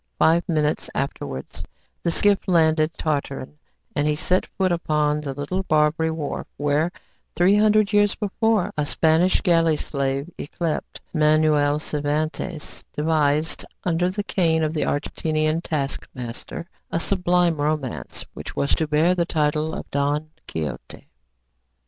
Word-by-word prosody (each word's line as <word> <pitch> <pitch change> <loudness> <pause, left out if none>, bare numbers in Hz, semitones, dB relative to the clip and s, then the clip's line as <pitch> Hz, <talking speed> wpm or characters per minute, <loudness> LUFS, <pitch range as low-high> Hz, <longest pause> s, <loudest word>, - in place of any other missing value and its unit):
Five 170 +2 +3
minutes 150 -2 0
afterwards 70 - -4 0.4
the 170 - 0
skiff 200 +4 +3
landed 160 -3 +3
Tartarin, 145 -2 -3 0.4
and 145 0 +1
he 150 - +2
set 180 +4 +1
foot 190 -2 0
upon 150 -3 +1
the 140 -3 -5
little 145 +7 -2
Barbary 155 -1 +2
wharf, 160 -3 -4
where, 150 +3 +1 0.4
three 180 +3 +4
hundred 210 -1 +4
years 205 0 +4
before, 215 -1 0
a 150 - 0
Spanish 160 +4 +3
galley 165 -4 +3
slave 140 0 -2
yclept 160 +1 -3
Miguel 150 -2 +3
Cervantes 155 +2 -3
devised, 155 0 +1 0.2
under 175 0 +1
the 205 +2 -3
cane 165 -6 +1
of 155 0 0
the 155 - 0
Algerian 155 +2 0
taskmaster, 135 -1 -4 0.2
a 165 - 0
sublime 180 -2 +2
romance 145 - -2
which - - -8
was 140 - +1
to 160 - 0
bear 155 +4 +3
the 170 -2 0
title 155 0 0
of - - -6
"Don 145 +2 0 0.2
Quixote." 75 -6 -6
155 Hz, 130 wpm, -23 LUFS, 150-175 Hz, 0.4 s, three